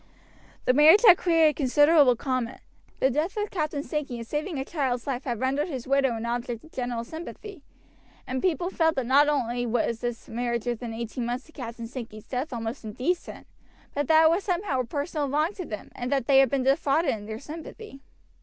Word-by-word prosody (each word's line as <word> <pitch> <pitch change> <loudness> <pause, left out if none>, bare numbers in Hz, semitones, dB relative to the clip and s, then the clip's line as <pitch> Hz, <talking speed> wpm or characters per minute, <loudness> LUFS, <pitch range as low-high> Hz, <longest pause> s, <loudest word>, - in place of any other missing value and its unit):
The 255 - +4
marriage 315 - +7
had 365 -5 +8
created 325 -3 +3
considerable 290 -1 +5
comment. 255 0 -3 0.4
The 265 - +3
death 315 - -1
of 420 0 -2
Captain 305 -5 -2
Sankey 295 -6 -3
in 230 - -6
saving 300 +7 -3
a 265 - -3
child's 265 -7 -2
life 265 -2 -3
had 240 -4 -2
rendered 275 +5 0
his 260 -7 -6
widow 270 -3 +2
an 225 +1 -4
object 240 -1 -3
of 315 - -16
general 245 -2 -3
sympathy, 335 - -9 0.6
and 260 0 -3
people 350 0 0
felt 320 -3 +2
that 265 - -1
not 280 +4 +5
only 245 -4 -1
was 235 0 0
this 240 -1 -4
marriage 235 0 -2
within 240 -1 -3
eighteen 235 +1 -4
months 245 +4 -4
of - - -18
Captain 235 -2 -7
Sankey's 225 -3 -8
death 265 +4 -3
almost 230 +1 -5
indecent, 255 - -3 0.5
but 290 -1 -1
that 320 0 +6
it 320 - +7
was 360 +4 0
somehow 360 -7 -1
a 250 - 0
personal 290 +3 -3
wrong 305 +7 +1
to 370 -4 -6
them, 210 -7 -7
and 245 +1 -5
that 270 -4 +1
they 270 0 +5
had 270 -2 +5
been 270 0 0
defrauded 275 +4 +2
in 210 -2 -7
their 220 0 -5
sympathy. 310 - -10
270 Hz, 200 wpm, -26 LUFS, 240-310 Hz, 0.6 s, had